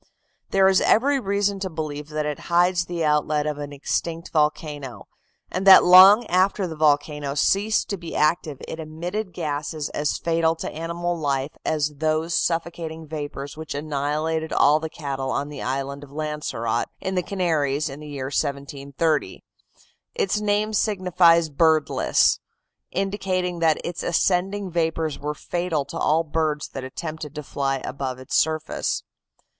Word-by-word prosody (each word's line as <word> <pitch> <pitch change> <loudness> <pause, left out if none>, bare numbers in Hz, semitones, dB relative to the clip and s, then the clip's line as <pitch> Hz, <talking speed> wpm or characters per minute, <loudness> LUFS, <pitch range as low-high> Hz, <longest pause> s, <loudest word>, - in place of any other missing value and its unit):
There 195 -1 +4
is 190 -1 +4
every 275 +5 +3
reason 200 -2 0
to 190 -1 -3
believe 155 -2 -5
that 155 -1 -2
it 150 -2 -3
hides 175 +1 +3
the 170 -2 -2
outlet 150 0 +1
of 150 -1 -3
an 145 0 -6
extinct 165 +4 -3
volcano, 150 -6 -1 0.4
and 190 +2 -2
that 190 - +10
long 190 +6 +8
after 190 +1 +2
the 165 -3 -5
volcano 150 -2 +1
ceased 205 +8 +2
to 200 - -1
be 170 -2 -8
active 155 -2 +1
it 160 - -6
emitted 175 +6 -4
gases 150 -2 -3
as 150 0 -1
fatal 165 -1 +1
to - - -5
animal 170 +2 -3
life 140 -3 -1
as 150 -2 -1
those 155 +2 0
suffocating 165 -1 -2
vapors 145 -2 -6
which 160 -1 -6
annihilated 155 +2 -2
all 150 +2 +4
the 160 0 -5
cattle 135 -4 -4
on 140 +2 -2
the 150 - -7
Island 135 +2 -3
of 145 - -12
Lancerote, 150 -6 -2
in 190 - -3
the 180 - +1
Canaries, 155 -7 0
in 140 0 -7
the 150 - -9
year 135 -2 -5
1730. 140 +2 -2 0.7
Its 405 - 0
name 210 +1 0
signifies 180 -6 +3
"birdless," 160 0 +3 0.5
indicating 185 -2 -2
that 160 -2 +3
its 175 0 -4
ascending 190 +2 0
vapors 160 -2 -1
were 150 +1 -3
fatal 170 -3 -2
to 140 - -7
all 160 +2 +2
birds 155 -1 -1
that 135 - -7
attempted 155 +2 -6
to 150 - -5
fly 135 -1 -1
above 130 -2 -4
its 130 0 -5
surface. 155 0 0
160 Hz, 150 wpm, -23 LUFS, 145-175 Hz, 0.7 s, that